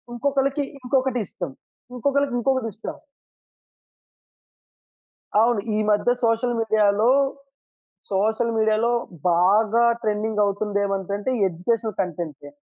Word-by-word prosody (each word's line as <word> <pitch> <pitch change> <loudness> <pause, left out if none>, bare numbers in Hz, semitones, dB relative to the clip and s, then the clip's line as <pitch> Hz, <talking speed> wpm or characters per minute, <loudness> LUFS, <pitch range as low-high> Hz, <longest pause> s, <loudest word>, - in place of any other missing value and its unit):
ఇంకొకళ్ళకి 275 +2 0 0.2
ఇంకొకటి 255 0 0
ఇష్టం, - - -6 0.4
ఇంకొకళ్ళకి 280 +1 0
ఇంకొకటి 260 -2 0
ఇష్టం. 220 - -7 2.4
అవును. 230 -1 +3 0.2
ఈ - - +1
మధ్య 210 +4 +3
సోషల్ 230 +2 +1
మీడియాలో, 215 0 +3 1.0
సోషల్ 220 +4 +1
మీడియాలో 220 +1 +2 0.4
బాగా 210 +7 +3 0.2
ట్రెండింగ్ 215 0 0
అవుతుంది 205 0 -1
ఏమంటంటే, 200 +3 -2 0.2
ఎడ్యుకేషనల్ 215 +5 -2
కంటెంటే. 160 -5 -5
220 Hz, 90 wpm, -23 LUFS, 200-240 Hz, 2.4 s, అవును